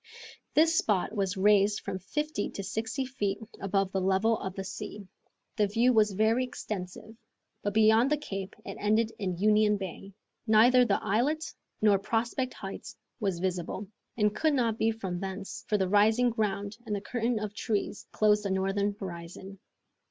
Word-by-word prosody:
This 325 Hz, +1 st, +5 dB
spot 205 Hz, -1 st, 0 dB
was 195 Hz, -1 st, -1 dB
raised 205 Hz, +1 st, +4 dB
from 190 Hz, -1 st, -4 dB
fifty 295 Hz, -, -3 dB
to 200 Hz, -, -6 dB
sixty 220 Hz, +7 st, -3 dB
feet 205 Hz, -6 st, -2 dB, 0.2 s
above 195 Hz, -1 st, 0 dB
the 190 Hz, -, -1 dB
level 190 Hz, +4 st, +2 dB
of 190 Hz, -1 st, -5 dB
the 195 Hz, -, -4 dB
sea. 200 Hz, +1 st, -7 dB, 0.5 s
The 210 Hz, -2 st, +3 dB
view 235 Hz, +5 st, +3 dB
was 210 Hz, -2 st, +3 dB
very 220 Hz, +5 st, +2 dB
extensive, 215 Hz, -3 st, -6 dB, 0.5 s
but 205 Hz, 0 st, -3 dB
beyond 220 Hz, +3 st, +5 dB
the 300 Hz, -, +2 dB
cape 195 Hz, -9 st, -6 dB
it -, -, -7 dB
ended 215 Hz, +2 st, +2 dB
in 185 Hz, -4 st, -2 dB
Union 210 Hz, +1 st, +3 dB
Bay. 195 Hz, +1 st, -7 dB, 0.3 s
Neither 245 Hz, +4 st, +6 dB
the 200 Hz, -4 st, +1 dB
islet 250 Hz, +10 st, +1 dB, 0.4 s
nor 205 Hz, -2 st, +5 dB
Prospect 235 Hz, +5 st, -1 dB
Heights 210 Hz, +4 st, -8 dB, 0.2 s
was 195 Hz, -5 st, -1 dB
visible, 185 Hz, +2 st, -3 dB, 0.3 s
and 210 Hz, -1 st, +2 dB
could 310 Hz, +4 st, +2 dB
not 230 Hz, -4 st, 0 dB
be 225 Hz, -, +3 dB
from 195 Hz, -6 st, -3 dB
thence, 195 Hz, +1 st, -6 dB
for 210 Hz, -, +2 dB
the 190 Hz, -2 st, +1 dB
rising 220 Hz, +5 st, +4 dB
ground 210 Hz, -2 st, -2 dB
and 210 Hz, -, -1 dB
the 200 Hz, -, -4 dB
curtain 235 Hz, +2 st, -1 dB
of 210 Hz, -1 st, -4 dB
trees 210 Hz, -1 st, -3 dB
closed 210 Hz, -1 st, +3 dB
the 200 Hz, -, -3 dB
northern 195 Hz, +2 st, 0 dB
horizon. 185 Hz, +1 st, -8 dB
210 Hz, 165 wpm, -29 LUFS, 195-225 Hz, 0.5 s, Neither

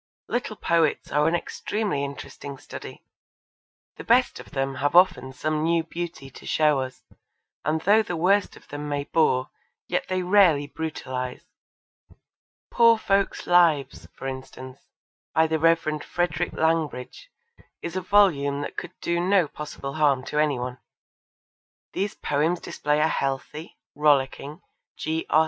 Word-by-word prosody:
Little 240 Hz, -3 st, -2 dB
poets 165 Hz, -5 st, +1 dB
are 150 Hz, +1 st, +3 dB
an 165 Hz, -, +2 dB
extremely 200 Hz, -3 st, -2 dB
interesting 140 Hz, 0 st, -7 dB
study. -, -, -10 dB, 0.9 s
The -, -, -8 dB
best -, -, +3 dB
of -, -, -11 dB
them 135 Hz, 0 st, -2 dB
have 145 Hz, +3 st, +1 dB
often 180 Hz, -7 st, +4 dB
some 155 Hz, +4 st, -2 dB
new 165 Hz, +1 st, +2 dB
beauty 165 Hz, -4 st, -6 dB
to -, -, -13 dB
show 150 Hz, -3 st, +3 dB
us, 130 Hz, -1 st, -6 dB, 0.6 s
and 155 Hz, +1 st, 0 dB
though 210 Hz, +5 st, +5 dB
the 175 Hz, -5 st, -4 dB
worst 195 Hz, +4 st, +2 dB
of -, -, -19 dB
them 145 Hz, 0 st, -5 dB
may 145 Hz, -1 st, -1 dB
bore 135 Hz, -4 st, +1 dB, 0.4 s
yet -, -, -1 dB
they 185 Hz, -1 st, 0 dB
rarely 180 Hz, -6 st, +4 dB
brutalise. 130 Hz, -5 st, -5 dB, 1.3 s
Poor 230 Hz, -1 st, +6 dB
Folks' 195 Hz, -2 st, 0 dB
Lives, 165 Hz, -6 st, +3 dB
for -, -, -9 dB
instance, 130 Hz, 0 st, -7 dB, 0.6 s
by 160 Hz, -, +5 dB
the 160 Hz, 0 st, 0 dB
Rev. 160 Hz, -2 st, +2 dB
Frederick 175 Hz, -1 st, -1 dB
Langbridge, 160 Hz, -, -1 dB, 0.6 s
is 170 Hz, +1 st, -5 dB
a 185 Hz, -, -1 dB
volume 160 Hz, -8 st, +3 dB
that -, -, -5 dB
could -, -, -5 dB
do 170 Hz, 0 st, 0 dB
no 180 Hz, -1 st, +3 dB
possible 145 Hz, -2 st, -7 dB
harm 145 Hz, -4 st, +2 dB
to 150 Hz, -, -2 dB
any 150 Hz, -3 st, +2 dB
one. 125 Hz, 0 st, -5 dB, 1.1 s
These 200 Hz, +1 st, -2 dB
poems 155 Hz, +4 st, 0 dB
display 150 Hz, -2 st, -1 dB
a 155 Hz, -, +4 dB
healthy, 140 Hz, +3 st, -3 dB, 0.2 s
rollicking, 145 Hz, +1 st, +1 dB, 0.3 s
G. 160 Hz, +1 st, -2 dB
R. 155 Hz, -, +5 dB
155 Hz, 145 wpm, -25 LUFS, 140-175 Hz, 1.3 s, Poor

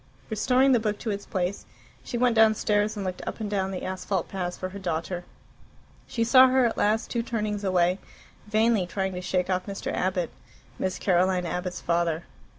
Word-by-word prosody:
Restoring 255 Hz, +5 st, +3 dB
the 245 Hz, -, +5 dB
book 215 Hz, -1 st, -1 dB
to 225 Hz, -, -3 dB
its 200 Hz, 0 st, -5 dB
place, 185 Hz, +1 st, -2 dB, 0.4 s
she 240 Hz, -, -4 dB
went 245 Hz, -1 st, +3 dB
downstairs, 215 Hz, -1 st, +3 dB
and 200 Hz, -, -3 dB
looked 185 Hz, -1 st, -4 dB
up -, -, -4 dB
and 215 Hz, -, -2 dB
down 190 Hz, -2 st, 0 dB
the 190 Hz, -1 st, -5 dB
asphalt 185 Hz, -1 st, -2 dB
paths 180 Hz, -2 st, -3 dB
for 185 Hz, -, -4 dB
her 200 Hz, +2 st, -8 dB
daughter. 175 Hz, 0 st, -3 dB, 0.8 s
She 230 Hz, -, -1 dB
saw 255 Hz, +3 st, +7 dB
her 260 Hz, 0 st, +3 dB
at 230 Hz, -, 0 dB
last, 215 Hz, +2 st, +1 dB
two 235 Hz, -, 0 dB
turnings 215 Hz, -3 st, -2 dB
away, 180 Hz, -1 st, +2 dB, 0.5 s
vainly 215 Hz, -3 st, +2 dB
trying 190 Hz, +1 st, -2 dB
to 180 Hz, -, -4 dB
shake 180 Hz, 0 st, 0 dB
off 185 Hz, +1 st, -1 dB
Mr. 200 Hz, -1 st, -4 dB
Abbott, 180 Hz, -2 st, -1 dB, 0.5 s
Miss 185 Hz, 0 st, -1 dB
Caroline 185 Hz, -1 st, +2 dB
Abbott's 180 Hz, +1 st, -3 dB
father. 170 Hz, -1 st, 0 dB
195 Hz, 185 wpm, -26 LUFS, 180-220 Hz, 0.8 s, saw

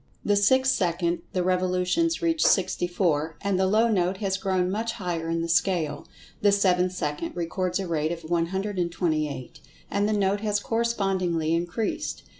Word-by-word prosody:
The 205 Hz, -, +3 dB
sixth 260 Hz, +6 st, +4 dB
second 170 Hz, -1 st, 0 dB
the 180 Hz, -, 0 dB
revolutions 185 Hz, -, +1 dB
reach 330 Hz, -1 st, +2 dB
sixty 185 Hz, -2 st, +2 dB
four, 160 Hz, -4 st, 0 dB
and 200 Hz, -2 st, 0 dB
the 190 Hz, -, +3 dB
low 220 Hz, +4 st, +3 dB
note 190 Hz, -4 st, +1 dB
has 195 Hz, -2 st, -1 dB
grown 185 Hz, -1 st, 0 dB
much 225 Hz, +3 st, -2 dB
higher 170 Hz, -5 st, -3 dB
in 165 Hz, 0 st, -1 dB
the -, -, -2 dB
scale. 165 Hz, -4 st, 0 dB, 0.3 s
The 205 Hz, -, +5 dB
seventh 185 Hz, -2 st, +2 dB
second 150 Hz, -1 st, -3 dB
records 180 Hz, +2 st, -2 dB
a 190 Hz, -, -3 dB
rate 160 Hz, -1 st, 0 dB
of 170 Hz, -1 st, -5 dB
128, 170 Hz, -5 st, -2 dB, 0.3 s
and 205 Hz, +1 st, +1 dB
the -, -, +1 dB
note 200 Hz, 0 st, +1 dB
has 210 Hz, -1 st, 0 dB
correspondingly 195 Hz, -8 st, 0 dB
increased. 175 Hz, +6 st, -2 dB
185 Hz, 160 wpm, -26 LUFS, 170-200 Hz, 0.3 s, The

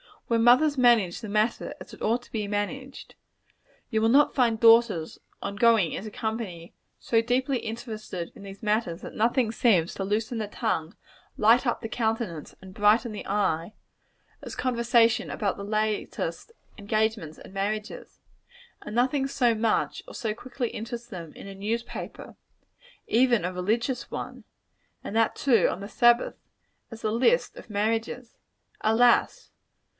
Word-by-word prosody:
Where 230 Hz, -1 st, +1 dB
mothers 255 Hz, +6 st, +5 dB
manage 235 Hz, -8 st, +4 dB
the 220 Hz, -, -7 dB
matter 215 Hz, +3 st, 0 dB
as -, -, -11 dB
it -, -, -13 dB
ought 235 Hz, +3 st, 0 dB
to -, -, -20 dB
be 215 Hz, -2 st, -2 dB
managed, 255 Hz, +7 st, -4 dB, 0.8 s
you 220 Hz, -1 st, +1 dB
will 225 Hz, -, +3 dB
not 285 Hz, +4 st, +5 dB
find 235 Hz, -4 st, +2 dB
daughters, 225 Hz, -8 st, +4 dB, 0.2 s
on 200 Hz, -, -4 dB
going 225 Hz, -7 st, +4 dB
into 215 Hz, -, -5 dB
company, 215 Hz, -7 st, -5 dB, 0.3 s
so 225 Hz, -1 st, +2 dB
deeply 255 Hz, +2 st, 0 dB
interested 220 Hz, -6 st, -6 dB
in -, -, -13 dB
these 195 Hz, +1 st, -11 dB
matters 210 Hz, -5 st, 0 dB
that -, -, -8 dB
nothing 235 Hz, +1 st, +1 dB
seems 195 Hz, -8 st, +2 dB
so -, -, -11 dB
to 195 Hz, 0 st, -3 dB
loosen 220 Hz, +3 st, -1 dB
the 215 Hz, -2 st, -2 dB
tongue, 200 Hz, -6 st, -2 dB, 0.4 s
light 230 Hz, +5 st, +4 dB
up 240 Hz, -, 0 dB
the 225 Hz, -, -5 dB
countenance, 220 Hz, -9 st, -2 dB
and 190 Hz, 0 st, -12 dB
brighten 215 Hz, +4 st, +3 dB
the 210 Hz, -, -7 dB
eye, 195 Hz, -3 st, 0 dB, 0.7 s
as -, -, -8 dB
conversation 235 Hz, -2 st, +2 dB
about 205 Hz, -4 st, -2 dB
the 200 Hz, -, -6 dB
latest 215 Hz, -, -2 dB, 0.3 s
engagements 215 Hz, -6 st, -1 dB
and -, -, -13 dB
marriages, 210 Hz, +2 st, -4 dB, 0.6 s
and 210 Hz, -, -7 dB
nothing 265 Hz, +3 st, +2 dB
so 245 Hz, -3 st, +2 dB
much 220 Hz, 0 st, 0 dB
or -, -, -10 dB
so 220 Hz, -4 st, -2 dB
quickly 245 Hz, +1 st, -4 dB
interest 235 Hz, +2 st, -7 dB
them 170 Hz, -5 st, -8 dB
in -, -, -11 dB
a 195 Hz, -, -8 dB
newspaper, 220 Hz, +4 st, -5 dB, 0.7 s
even 240 Hz, -2 st, +3 dB
a 180 Hz, +1 st, -2 dB
religious 230 Hz, +7 st, -1 dB
one, -, -, -7 dB, 0.6 s
and -, -, -6 dB
that, 225 Hz, 0 st, +2 dB
too, 235 Hz, -9 st, +3 dB
on 190 Hz, -, -4 dB
the 200 Hz, -, -7 dB
Sabbath, 240 Hz, +1 st, +3 dB, 0.5 s
as 225 Hz, -1 st, -10 dB
the 215 Hz, -, -1 dB
list 260 Hz, -, +2 dB
of -, -, -12 dB
marriages. 225 Hz, +3 st, -2 dB, 0.4 s
Alas! 230 Hz, +2 st, +3 dB
225 Hz, 155 wpm, -26 LUFS, 205-240 Hz, 0.8 s, mothers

